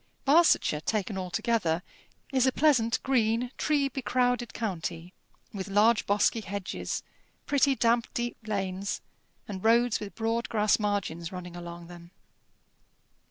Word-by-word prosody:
Barsetshire, 290 - +4
taken 210 +2 -1
altogether, 180 -1 0 0.5
is 260 -1 +3
a - - +4
pleasant 250 -6 +3
green 240 -1 +1
tree 290 -2 +1
becrowded 245 -1 0
county, 180 -4 -4 0.4
with 195 -1 -5
large 210 +3 +3
bosky 205 +3 +2
hedges, 200 -1 -4 0.4
pretty 280 -1 +3
damp 235 -1 +2
deep 240 0 -2
lanes, 195 -1 -2 0.5
and 190 -3 -6
roads 235 +1 +4
with 205 -1 -8
broad 225 +1 -1
grass 210 -1 +2
margins 200 -6 -2
running 180 -1 -7
along 170 0 -8
them. 170 0 -12
215 Hz, 120 wpm, -28 LUFS, 185-240 Hz, 0.5 s, Barsetshire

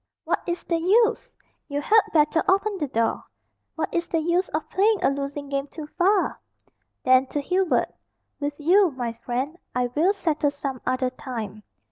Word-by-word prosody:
"What - - 0
is 345 0 -2
the 335 -1 0
use? 425 +7 +2 0.4
You 285 -1 -2
had 430 +9 +5
better 310 +1 +3
open 395 +1 +2
the 295 - -1
door. 230 -3 0 0.5
What 320 - -3
is 340 0 0
the 330 - 0
use 345 +3 +1
of 310 0 -3
playing 420 +3 +3
a - - +4
losing 280 +1 -4
game 275 0 -2
too 305 +1 -8
far?" 385 +2 +2 0.6
Then, 255 +1 +5
to 290 - -2
Hubert, 365 +5 +1 0.5
"With 290 0 -3
you, 365 +5 +5
my 245 -5 -4
friend, 255 +8 -4 0.2
I 250 -1 0
will 340 +8 +3
settle 315 -7 0
some 275 -3 -5
other 255 0 0
time." 225 -5 -6
295 Hz, 170 wpm, -24 LUFS, 265-355 Hz, 0.6 s, had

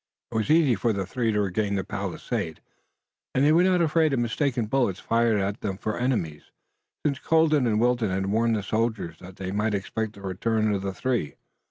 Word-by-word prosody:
It - - -7
was 110 +4 0
easy 155 -5 +5
for 115 +1 0
the 100 -2 -2
three 115 +3 -1
to 105 - 0
regain 100 +1 -1
the 95 - -1
palisade, - - -4 0.8
and 130 +2 +4
they 150 - +5
were 165 +2 +5
not 180 -1 +3
afraid 160 -1 +2
of 130 - +1
mistaken 120 0 0
bullets 105 -5 0
fired 115 -2 +2
at 100 +2 -2
them 95 -3 -3
for 110 +1 -3
enemies, 110 - -2 0.6
since 140 -2 +1
Colden 155 -5 +3
and 105 -2 +1
Wilton 120 -2 +2
had 95 +1 -1
warned 115 +3 +2
the 105 - -2
soldiers 110 -6 -2
that 95 0 -11
they 95 -1 -5
might 105 +1 0
expect 105 +3 -3
the 100 - -14
return 110 +3 0
of 100 - -1
the 95 0 -2
three. 120 - -2
110 Hz, 205 wpm, -26 LUFS, 100-130 Hz, 0.8 s, easy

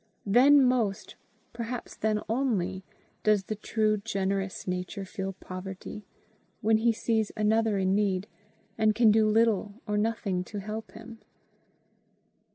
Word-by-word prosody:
Then 265 +7 +6
most, 225 -5 0 0.4
perhaps 235 +1 -5
then 215 -1 0
only, 205 -7 -1 0.4
does 210 -2 +3
the 215 - -4
truly 215 0 0
generous 195 -3 -2
nature 185 +2 -3
feel 190 0 -5
poverty, 190 +2 -8 0.5
when 220 0 +3
he 235 +1 +3
sees 220 -1 0
another 215 0 +2
in 190 0 +1
need 195 -2 +1 0.5
and 215 -1 +3
can 230 -2 +5
do 215 0 +4
little 215 -2 +2
or 210 0 0
nothing 210 -4 -1
to 210 - -8
help 215 +2 -6
him. 230 0 -11
215 Hz, 130 wpm, -28 LUFS, 195-225 Hz, 0.5 s, Then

